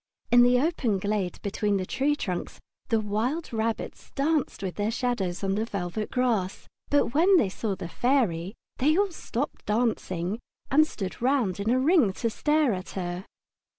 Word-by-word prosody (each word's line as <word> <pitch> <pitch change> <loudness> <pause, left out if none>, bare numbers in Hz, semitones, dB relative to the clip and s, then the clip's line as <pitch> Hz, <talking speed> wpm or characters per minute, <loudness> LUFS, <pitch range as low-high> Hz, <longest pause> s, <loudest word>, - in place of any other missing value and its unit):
In 245 0 +8
the 245 0 +5
open 270 - +1
glade 200 -2 -2
between 205 0 0
the 185 - -2
tree 275 +7 +1
trunks 185 -11 -4 0.3
the 225 -2 +3
wild 230 +10 -2
rabbits 225 0 -3
danced 295 -6 0
with 185 -2 -2
their 205 +1 -1
shadows 225 -7 -1
on 195 0 +1
the 210 +2 0
velvet 200 -1 -3
grass, 225 -7 0 0.2
but 285 -4 +2
when 360 +5 +5
they 210 - +3
saw 200 +1 -3
the 180 -2 -6
Fairy 200 -4 0 0.2
they 305 +5 +3
all 400 -1 +2
stopped 280 -4 -4
dancing 210 -4 0 0.3
and 310 +3 +5
stood 195 -6 -6
round 245 -8 +1
in 205 +2 -1
a 250 - +3
ring 275 - +4
to 230 +3 -2
stare 295 0 +2
at 185 -1 -5
her. 180 +1 -3
225 Hz, 170 wpm, -27 LUFS, 195-270 Hz, 0.3 s, In